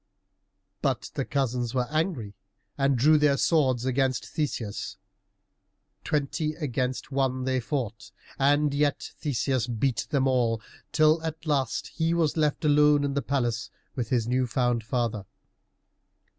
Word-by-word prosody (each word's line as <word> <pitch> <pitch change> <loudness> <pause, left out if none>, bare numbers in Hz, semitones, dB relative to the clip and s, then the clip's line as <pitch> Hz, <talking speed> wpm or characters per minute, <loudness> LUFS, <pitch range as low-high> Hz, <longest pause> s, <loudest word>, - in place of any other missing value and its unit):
But - - -1
the - - -2
cousins 125 -3 -1
were 125 -1 +2
angry 155 - -1 0.4
and 135 -1 +2
drew 150 +5 +5
their 145 -2 +3
swords 130 -8 +2
against 130 -1 +1
Theseus. 125 -9 -3 1.1
Twenty 150 +1 -1
against 130 -4 -2
one 130 -1 0
they 130 0 +1
fought, 115 -4 -4 0.3
and 145 +1 +3
yet 145 0 0
Theseus 130 -3 0
beat 120 +1 -1
them 135 -2 +2
all, 120 -3 +2 0.3
till 155 +1 +4
at 160 0 -5
last 140 -6 0
he 165 0 0
was 160 -3 +1
left 155 -1 0
alone 150 0 +5
in 140 -1 -1
the 140 - 0
palace 120 -3 -1 0.3
with 120 -4 -3
his 120 -3 +1
new 125 +1 +1
found 120 -1 0
father. 115 -4 -2
135 Hz, 135 wpm, -27 LUFS, 120-150 Hz, 1.1 s, drew